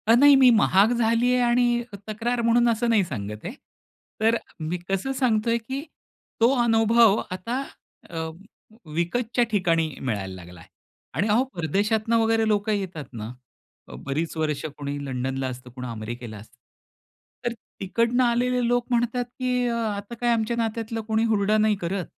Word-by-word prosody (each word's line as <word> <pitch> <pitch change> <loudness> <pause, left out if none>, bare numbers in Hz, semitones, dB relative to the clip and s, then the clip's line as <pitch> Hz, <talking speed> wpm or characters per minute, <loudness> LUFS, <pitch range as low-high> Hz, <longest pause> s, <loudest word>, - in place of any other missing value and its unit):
अ 225 - +6
नाही 285 +3 +7
मी 265 -2 +7
महाग 210 -1 +4
झाली 235 +1 +2
आहे 250 - +2
आणि 240 0 +2 0.3
तक्रार 235 +3 -1
म्हणून 235 +1 +3
असं 235 +1 +1
नाही 220 -4 +4
सांगत 105 -7 -6
आहे. - - -4 0.7
तर 225 +1 +4 0.2
मी 160 +3 -2
कसं 195 +7 -1
सांगतोय 235 -3 +1
की 265 +4 -5 0.6
तो 235 +3 +6
अनुभव 225 -1 +4
आता 230 +8 -3 0.5
अ, 170 - -10 0.8
विकतच्या 230 +9 0
ठिकाणी 165 -6 +2
मिळायला 100 -7 -3
लागलाय. 90 -2 -12 0.5
आणि 205 - 0
अहो 220 +4 +3
परदेशातनं 210 +7 +1
वगैरे 225 0 +2
लोक 210 0 +1
येतात 190 -8 -2
ना. 110 -1 -6 0.6
अ, - - -10
बरीच 155 +5 -2
वर्ष 150 -2 -1
कुणी 145 0 -4
लंडनला 130 0 -2
असतं 125 0 -8
कुणी 125 +1 -7
अमेरिकेला 115 0 -6
असतं. 110 +6 -15 0.9
तर 240 - 0 0.3
तिकडनं 230 +6 +1
आलेले 245 0 +1
लोक 245 0 +1
म्हणतात 240 +1 +1
की 250 0 -1
अ, 235 - -1
आता 215 0 -3
काय 240 - +2
आमच्या 230 +1 -1
नात्यातला 225 0 -2
कोणी 220 0 +1
हुरडा 210 +1 +2
नाही 215 0 +3
करत. 180 +1 -2
220 Hz, 155 wpm, -25 LUFS, 165-235 Hz, 0.9 s, नाही